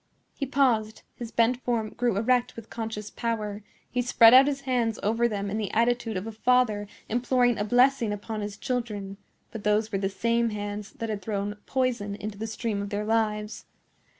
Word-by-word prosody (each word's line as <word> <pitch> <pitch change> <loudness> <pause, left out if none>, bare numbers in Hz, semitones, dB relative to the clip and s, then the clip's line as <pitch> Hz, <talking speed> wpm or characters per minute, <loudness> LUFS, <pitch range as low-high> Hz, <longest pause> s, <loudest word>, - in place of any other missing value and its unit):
He 275 - -4
paused; 240 -6 +1
his 235 -2 -7
bent 235 +2 +2
form 225 -3 -1
grew 240 -4 0
erect 250 +3 +1
with 230 -1 -11
conscious 220 -2 -5
power; 215 -3 -3 0.3
he 250 - 0
spread 235 -1 +6
out 265 +2 +8
his 275 -1 -1
hands 245 -5 0
over 230 +3 +2
them 200 -3 -3
in 215 - -1
the 210 - -2
attitude 230 -2 +1
of 185 - -4
a 225 - -5
father 220 -2 +2 0.2
imploring 245 0 +2
a - - +1
blessing 245 0 +3
upon 210 +1 -4
his 205 -1 -5
children; 210 -6 -3 0.3
but 220 -3 -7
those 210 +1 +1
were 195 - -1
the 195 0 0
same 230 +4 +1
hands 205 -1 -5
that 230 - -5
had 210 -2 -3
thrown 205 0 -3
poison 245 -6 -1
into 210 0 -7
the 225 - -3
stream 220 -2 -3
of 200 - -5
their 210 0 -2
lives. 215 -1 -1
225 Hz, 190 wpm, -27 LUFS, 210-245 Hz, 0.3 s, out